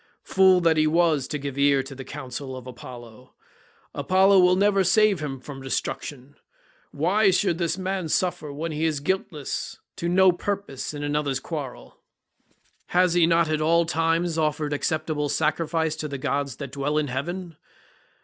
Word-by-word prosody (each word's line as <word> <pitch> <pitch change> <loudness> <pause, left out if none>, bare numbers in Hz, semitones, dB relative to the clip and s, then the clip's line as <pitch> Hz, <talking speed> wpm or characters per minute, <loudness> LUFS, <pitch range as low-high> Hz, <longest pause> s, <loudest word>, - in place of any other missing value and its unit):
Fool 190 -1 +4
that 165 -2 +3
he 155 0 +3
was 155 -4 +2
to 150 - -3
give 140 -1 -5
ear 140 -1 +4
to 135 +1 -9
the 135 0 -8
counsel 130 -1 -7
of 125 - -10
Apollo. 125 -1 -11 0.6
Apollo 190 +6 +4
will 180 0 +5
never 200 0 +3
save 200 +1 +3
him 140 -3 -5
from 135 +1 -9
destruction. 135 +1 -4 0.5
Why 190 +8 +2
should 185 -2 +1
this 170 0 0
man 185 -3 -3
suffer 155 -3 -1
when 160 +4 -4
he 155 +1 -3
is 155 -3 +1
guiltless, 150 -3 -3 0.2
to 170 - -2
no 185 +1 +5
purpose, 185 -6 -4
and 145 - -5
in 145 - -2
another's 145 -3 0
quarrel? 145 -6 -7 0.9
Has 180 -1 +3
he 175 -2 +4
not 165 -1 +3
at 155 0 -1
all 170 +2 +3
times 165 0 0
offered 150 -1 0
acceptable 150 0 -1
sacrifice 160 +1 0
to 155 - -4
the 140 -1 -5
gods 140 -1 -2
that 140 -1 -7
dwell 145 +2 -1
in 155 - +1
heaven? 170 +6 -4
155 Hz, 170 wpm, -25 LUFS, 140-175 Hz, 0.9 s, will